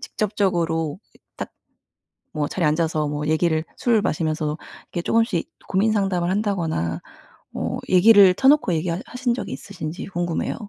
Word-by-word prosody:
직접적으로 175 -7 -1 0.4
딱 - - -5 0.8
뭐 150 -1 -1
자리에 175 +1 -1
앉아서 155 -1 0
뭐 150 0 -3
얘기를 160 0 +1
술을 230 -3 +2
마시면서 155 -1 -1 0.3
이렇게 175 - -2
조금씩 230 +5 +1 0.2
고민 200 +4 +2
상담을 195 -4 0
한다거나 170 - -1 0.5
뭐 - - -3
얘기를 195 0 +7
터놓고 270 -5 +4
얘기하 170 +2 -1
하신 250 -1 -1
적이 250 - -5
있으신지 175 -4 -6
궁금해요. 175 -3 -2
175 Hz, 335 characters per minute, -22 LUFS, 155-205 Hz, 0.8 s, 얘기를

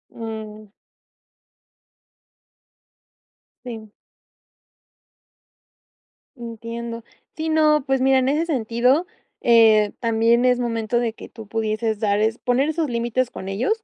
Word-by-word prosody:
Mm. 215 -2 -8 3.0
Sí. 220 -3 -8 2.4
Entiendo. 230 -1 -7 0.3
Sí, 320 0 -3
no. 305 -2 +3
Pues 270 -1 0
mira, 265 0 +4
en 260 0 +1
ese 305 +4 +1
sentido, 255 +2 +1 0.4
eh, 220 -3 +5
también 230 +1 +2
es 250 -1 +3
momento 230 -1 -1
de 235 -2 -1
que - - -12
tú 225 -3 -12
pudieses 220 0 -2
dar 205 -1 +1
es 220 +2 +1
poner 255 +4 +1
esos 315 -1 -1
límites 240 +1 -1
con 190 - -8
ellos. 415 - -1
235 Hz, 110 wpm, -22 LUFS, 220-260 Hz, 3.0 s, eh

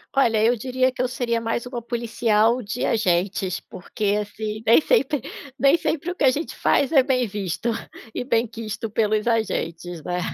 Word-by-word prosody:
Olha, 230 -5 +3
eu 240 +2 +4
diria 255 +2 0
que 250 - -4
eu 255 - +1
seria 235 -2 -1
mais 230 +1 -2
uma 245 -1 -5
policial 230 0 +1
de 215 +2 -3
agentes, 185 -3 0
porque, 205 +2 -3
assim, 215 +1 -5
nem 225 +1 +6
sempre 295 - +1 0.4
nem 280 +3 +5
sempre 335 0 -2
o - - -6
que 345 - -2
a 265 - +7
gente 295 +6 -3
faz 280 - +2
é 275 -5 +6
bem 255 -2 +1
visto 205 +2 -3 0.4
e - - -3
benquisto 225 -2 -2
pelos 215 0 +1
agentes, 175 -7 -2
né? 180 +2 -2
230 Hz, 175 wpm, -23 LUFS, 210-255 Hz, 0.4 s, a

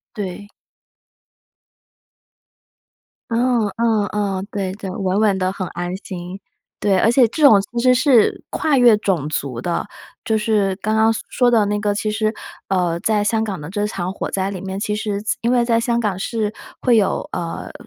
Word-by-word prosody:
对。 205 -1 -6 2.8
嗯 235 -2 +2
嗯 225 -3 +2
嗯， 200 -2 -2
对 190 -2 -3
对， 195 -1 -7
稳 190 +1 -1
稳 205 -3 +3
的 185 0 0
很 190 -2 -4
安 175 +1 -4
心。 185 -1 -8 0.4
对， 195 -2 +2
而 225 - +4
且 245 +1 +5
这 310 - -5
种 220 -9 +7
其 235 +4 -5
实 255 0 +5
是 255 -4 +3
跨 300 -3 +1
越 240 -4 +6
种 170 -8 -1
族 135 -5 -3
的。 175 +4 -2 0.4
就 220 -1 +1
是 210 -3 +1
刚 215 +1 0
刚 220 +1 +4 0.2
说 245 -1 +2
的 225 -3 +3
那 205 0 -1
个， 205 -1 0
其 215 0 -1
实， 215 +1 0 0.3
呃， 175 -3 0
在 210 0 +1
香 220 +1 +1
港 195 -6 -4
的 150 - -7
这 205 +1 -1
场 185 -3 -3
火 - - -4
灾 195 0 -2
里 190 - -5
面， 190 0 -5
其 210 0 -1
实 210 -2 -3
在 215 - -1
因 235 - +1
为 245 -1 +3
在 230 -1 +2
香 235 0 0
港 200 -4 -1
是 215 0 -2 0.3
会 240 -3 +4
有， 200 -3 0
呃， 170 -2 -5
210 Hz, 195 characters per minute, -20 LUFS, 190-225 Hz, 2.8 s, 种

